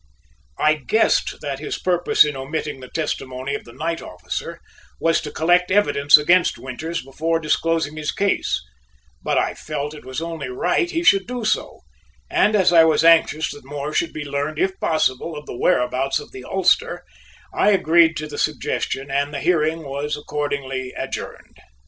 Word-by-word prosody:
I 155 0 +3
guessed 220 +1 +2
that 140 -3 -4
his 150 - -4
purpose 175 -4 +3
in 150 -1 -3
omitting 140 +1 -4
the 130 - -10
testimony 135 -3 -4
of - - -5
the 120 - -12
night 165 +6 -3
officer 90 - -6 0.4
was 165 0 +2
to 150 - -6
collect 175 +4 +2
evidence 150 -8 +5
against 170 +4 +3
Winters 155 +6 -5
before 160 +5 -1
disclosing 160 0 0
his 150 -1 -2
case, 200 - 0 0.6
but - - 0
I - - +1
felt 150 -1 -5
it 150 - -11
was 130 +2 -5
only 165 -5 -5
right 180 - 0
he 335 0 -2
should 195 - +4
do 245 -2 -4
so 215 - -1 0.5
and 215 +1 +3
as 185 -4 +4
I 165 -1 +8
was 160 0 +3
anxious 160 -1 +4
that 145 - -11
more 145 +2 -5
should 170 - 0
be 150 -1 -6
learned 145 +2 -3
if 190 +3 -1
possible 155 0 0
of 150 - -9
the - - -7
whereabouts 125 +3 +1
of - - -11
the 130 - -10
ulster, 190 - +1 0.5
I - - +3
agreed 165 -4 +4
to 155 - -4
the 145 -1 -7
suggestion 140 -2 -2
and 140 +1 0
the 140 - -4
hearing 160 -1 +1
was 145 +1 -3
accordingly 140 -3 -4
adjourned. - - -7
155 Hz, 175 wpm, -21 LUFS, 140-170 Hz, 0.6 s, I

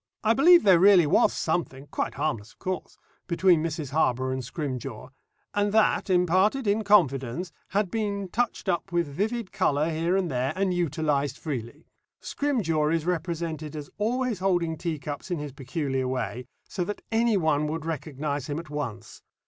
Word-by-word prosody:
I 220 0 +4
believe 340 +7 +7
there 190 -4 +6
really 190 -2 +7
was 145 - +4
something 155 -5 -2
quite - - -2
harmless, 115 +1 -2
of - - -36
course 185 -1 -5 0.3
between 175 -1 +3
Mrs. 155 -4 -3
Harborough 130 -4 +1
and 130 0 -2
Scrimgeour, 130 -3 -5 0.4
and 205 0 +1
that, 220 -2 +3
imparted 185 +8 +3
in 210 +2 +1
confidence, 165 - +2 0.2
had 200 -2 0
been 200 -3 -2
touched 240 +1 -1
up 175 0 -1
with 170 -1 +1
vivid 205 +9 -3
colour 150 +3 +1
here 165 +4 +1
and 180 -5 -1
there 130 +3 -1
and 190 -1 +1
utilised 150 -4 0
freely. 140 -1 -6 0.3
Scrimgeour 165 - 0
is 165 -1 0
represented 165 -3 -3
as 150 -2 -7
always 240 0 0
holding 175 -4 +1
teacups 155 -1 -5
in 175 - -1
his 145 -1 -5
peculiar 135 -1 -2
way, 125 -1 -3 0.2
so 185 - -2
that 205 +3 -5
anyone 190 -10 +2
would 160 +1 -4
recognise 145 -3 -3
him 145 - -2
at 165 -2 -7
once. 135 -7 -5
165 Hz, 160 wpm, -26 LUFS, 145-195 Hz, 0.4 s, believe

